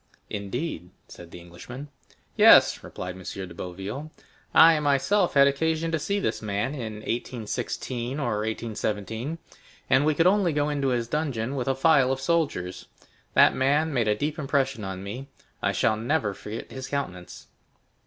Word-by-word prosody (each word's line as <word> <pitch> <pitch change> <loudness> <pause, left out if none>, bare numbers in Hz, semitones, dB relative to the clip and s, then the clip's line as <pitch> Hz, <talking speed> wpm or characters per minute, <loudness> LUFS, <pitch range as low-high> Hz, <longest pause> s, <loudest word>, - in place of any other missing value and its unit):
"Indeed!" 100 - -4 0.2
said 85 - -12
the 90 - -10
Englishman. 125 +12 -10 0.5
"Yes," - - +7
replied 90 0 -6
M. 95 - -11
de 95 -1 -6
Boville; 95 - -6 0.4
"I 160 -1 +7
myself 150 +7 +2
had 140 0 +7
occasion 160 +3 0
to 160 - 0
see 200 +6 -1
this - - -2
man 105 +5 -2
in 115 -7 -5
1816 120 +3 -4
or 120 -7 -1
1817, 110 +4 -3 0.5
and 130 +2 +5
we 155 0 +2
could 165 - +3
only 185 -3 +3
go 145 0 +1
into 140 -2 -1
his 120 -3 0
dungeon 135 -3 -2
with 130 -2 -3
a 135 - +1
file 135 -2 +4
of 135 - -1
soldiers. 95 - -1 0.5
That - - +7
man 145 +4 +1
made 120 -4 +1
a 105 - +3
deep 150 +7 -3
impression 135 -5 0
on 95 -1 -5
me; 125 +8 -7 0.3
I - - +1
shall 110 - +1
never 115 -2 0
forget 105 +3 -8
his 130 -1 -6
countenance!" 90 -11 -5
130 Hz, 160 wpm, -26 LUFS, 105-150 Hz, 0.5 s, Yes